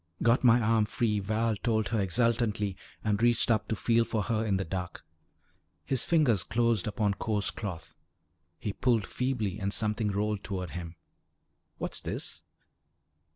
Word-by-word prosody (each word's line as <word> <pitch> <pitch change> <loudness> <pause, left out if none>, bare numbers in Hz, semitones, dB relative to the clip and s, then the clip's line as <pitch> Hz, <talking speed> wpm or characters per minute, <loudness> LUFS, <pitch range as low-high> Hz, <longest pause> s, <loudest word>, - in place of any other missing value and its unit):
"Got 115 +3 +4
my 120 -1 +6
arm 110 -1 +3
free," 105 0 0
Val 110 +3 0
told 110 0 0
her 110 -2 +1
exultantly 105 0 +1 0.3
and 105 0 0
reached 120 0 +3
up 110 -3 +1
to 110 - -1
feel 115 +2 +2
for 110 -2 -1
her 110 0 0
in 100 -3 +1
the 95 - -2
dark. 90 0 -5 0.8
His 130 -3 0
fingers 145 - +3
closed 115 -3 +1
upon 105 -1 0
coarse 105 0 0
cloth. 90 -6 -7 0.6
He 100 +5 -4
pulled 115 -4 +1
feebly 125 -7 -2
and 100 -1 -1
something 105 0 0
rolled 105 0 -1
toward 90 -4 -4
him. 85 -1 -6 0.8
"What's - - -2
this?" - - -4
110 Hz, 155 wpm, -29 LUFS, 100-115 Hz, 0.8 s, my